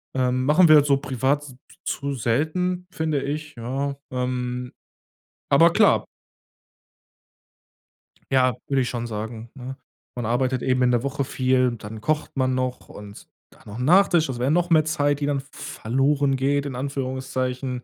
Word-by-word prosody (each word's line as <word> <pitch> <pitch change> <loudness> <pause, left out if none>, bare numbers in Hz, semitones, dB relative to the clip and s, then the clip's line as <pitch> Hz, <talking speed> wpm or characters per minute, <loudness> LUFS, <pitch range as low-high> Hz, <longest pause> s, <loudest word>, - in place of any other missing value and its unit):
Ähm, 130 0 +1
machen 165 +4 +5
wir 150 -2 +7
so 140 -1 +3
privat 135 +1 -1
s 130 -3 -11 0.3
zu 140 0 -2
selten, 160 +10 -1
finde 155 -4 -1
ich, 150 0 -5
ja, 135 +4 -3 0.2
ähm 125 -1 -3 0.8
Aber - - +6
klar - - +4 2.3
Ja, 130 -1 +3
würde 135 -1 +2
ich 125 - -1
schon 120 -1 -4
sagen, 110 +1 -6
ne? 130 0 -7 0.4
Man 120 - -3
arbeitet 125 +2 0
eben 130 -1 +1
in 125 - +3
der 120 +1 +1
Woche 140 0 -2
viel 130 0 +2
und 120 -3 -4
dann 110 +1 -7
kocht 155 +3 -1
man 130 -1 +1
noch. 130 -1 -3
Und 105 0 -11 0.2
dann - - -21
noch 105 +2 -9
'n - - -2
Nachtisch, 175 -2 +4
das 125 -2 -5
wär 125 +3 +1
noch 175 +2 +2
mehr 155 -2 +4
Zeit, 145 -2 0
die 145 - -1
dann 140 -1 0
v 135 - -21 0.3
verloren 135 +3 +1
geht 140 +2 +1
in 135 - -5
Anführungszeichen. 130 -1 -3
130 Hz, 165 wpm, -23 LUFS, 125-145 Hz, 2.3 s, wir